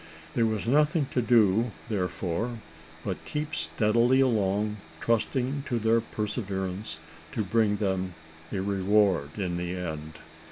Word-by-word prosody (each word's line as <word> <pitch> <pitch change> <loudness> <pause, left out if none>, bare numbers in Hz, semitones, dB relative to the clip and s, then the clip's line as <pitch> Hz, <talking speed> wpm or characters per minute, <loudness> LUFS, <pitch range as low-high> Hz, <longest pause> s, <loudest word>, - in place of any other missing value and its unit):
There 115 -2 +3
was 110 -2 -1
nothing 150 +4 +3
to 125 - +1
do, 115 -1 +4 0.2
therefore, 100 +2 -2 0.5
but 95 -3 -3
keep 150 0 -3
steadily 120 +4 +2
along, 105 -4 +2 0.2
trusting 125 +4 0
to 120 - 0
their 115 +1 +3
perseverance 100 -4 -3 0.4
to 110 - 0
bring 105 +1 +2
them 95 -3 -1 0.4
a 95 - -1
reward 95 -5 +2
in 90 -4 -1
the 90 +1 -3
end. 80 -3 -5
105 Hz, 125 wpm, -28 LUFS, 95-115 Hz, 0.5 s, do